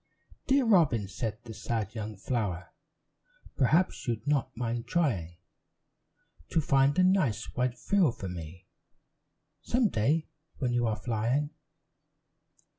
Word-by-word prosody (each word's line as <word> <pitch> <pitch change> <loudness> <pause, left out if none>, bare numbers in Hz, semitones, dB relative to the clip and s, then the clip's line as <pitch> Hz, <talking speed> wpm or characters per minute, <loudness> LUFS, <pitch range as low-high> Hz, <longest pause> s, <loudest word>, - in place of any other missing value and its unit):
"Dear 270 -1 +4
Robin," 155 - +4
said 105 +3 -4
the 115 -2 -8
sad 110 -2 -3
young 110 -1 -5
flower, 100 -5 -2 0.8
"Perhaps 155 +7 +2
you'd 115 -2 -2
not 145 -5 0
mind 115 -1 -2
trying 100 - 0 1.1
To 165 - +2
find 140 -1 +3
a 185 - +5
nice 160 - +2
white 125 -1 -1
frill 190 -9 +2
for 100 - -7
me, 85 -1 -8 1.0
Some 240 -3 +2
day 150 +8 +1 0.3
when 125 -3 -1
you 120 -1 +2
are 110 - 0
flying?" 120 +6 -1
120 Hz, 120 wpm, -29 LUFS, 110-150 Hz, 1.1 s, a